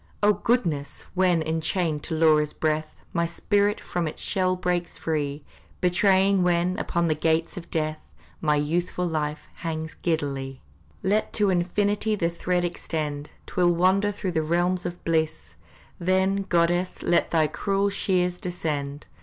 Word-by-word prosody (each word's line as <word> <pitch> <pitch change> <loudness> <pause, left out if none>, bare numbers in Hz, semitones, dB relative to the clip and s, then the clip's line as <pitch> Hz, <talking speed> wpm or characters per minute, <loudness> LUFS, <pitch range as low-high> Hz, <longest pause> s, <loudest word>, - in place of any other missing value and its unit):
Oh, 210 0 +6
goddess! 170 - -1
when, 180 -3 +3
enchained 160 0 -1
to 160 - -2
Laura's 155 -2 +4
breath, 155 0 -1 0.2
My 170 -1 +1
spirit 205 +4 +1
from 175 -2 -2
its 155 - -6
shell 185 -2 +1
breaks 180 -1 -2
free, 145 -2 -2 0.4
Betraying 190 +2 +3
when, 180 0 +2
upon 170 0 0
the 160 - +3
gates 160 +2 0
of 170 -2 -8
death, 155 -1 -1 0.4
My 150 -2 +3
youthful 175 +4 0
life 155 -2 -3
hangs 160 -1 -4
giddily, 135 -5 -2 0.4
Let 210 +3 +1
to 205 -3 +4
infinity 205 +4 +1
the 170 -4 0
thread 175 +1 0
extend, 150 -4 -3 0.2
'Twill 175 -1 +2
wander 190 +4 +3
through 190 -2 -3
the 160 -2 +1
realms 175 +3 0
of 175 0 -8
bliss, 160 -1 -1 0.5
Then, 190 +2 +1
goddess, 175 +1 +1
let 175 - +2
thy 160 -2 +3
cruel 200 +5 0
shears 180 -2 0
descend! 150 -5 -3
175 Hz, 145 wpm, -25 LUFS, 155-185 Hz, 0.5 s, Oh